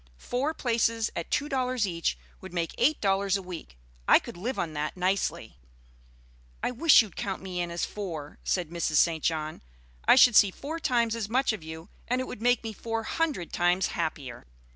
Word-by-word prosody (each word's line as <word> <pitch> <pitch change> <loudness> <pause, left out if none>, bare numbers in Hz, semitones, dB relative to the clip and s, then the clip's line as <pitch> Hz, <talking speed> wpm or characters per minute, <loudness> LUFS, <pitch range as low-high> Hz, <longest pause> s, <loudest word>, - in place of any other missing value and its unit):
Four 275 - -2
places 230 -3 0
at 170 - -4
two 290 - 0
dollars 255 -5 0
each 170 -3 -1 0.2
would 190 -1 -10
make 170 -1 -1
eight 290 +6 +3
dollars 195 0 +2
a - - -6
week. 170 - -9 0.3
I - - +8
could - - -7
live 235 +9 -4
on 165 -2 -2
that 150 +3 -3
nicely." 180 - -1 1.0
"I - - +1
wish 265 +1 +6
you'd 205 -6 -11
count 195 -1 -4
me 180 -2 -3
in 175 - -2
as 170 0 -2
four," 165 -8 -6
said 175 -4 -1
Mrs. 170 -2 -1
St. 160 0 +3
John. 155 -1 -2 0.4
"I - - +7
should 250 -3 +7
see 205 - +7
four 295 - -6
times 235 -6 +1
as 220 -3 -4
much 255 0 +2
of 215 - -6
you, 160 +2 -9 0.2
and 250 +1 0
it 255 - -2
would 225 - -8
make 245 0 +3
me 225 -1 -5
four 225 +1 -3
hundred 295 - -2
times 175 +1 +2
happier." 140 - -4
195 Hz, 195 wpm, -28 LUFS, 170-245 Hz, 1.0 s, I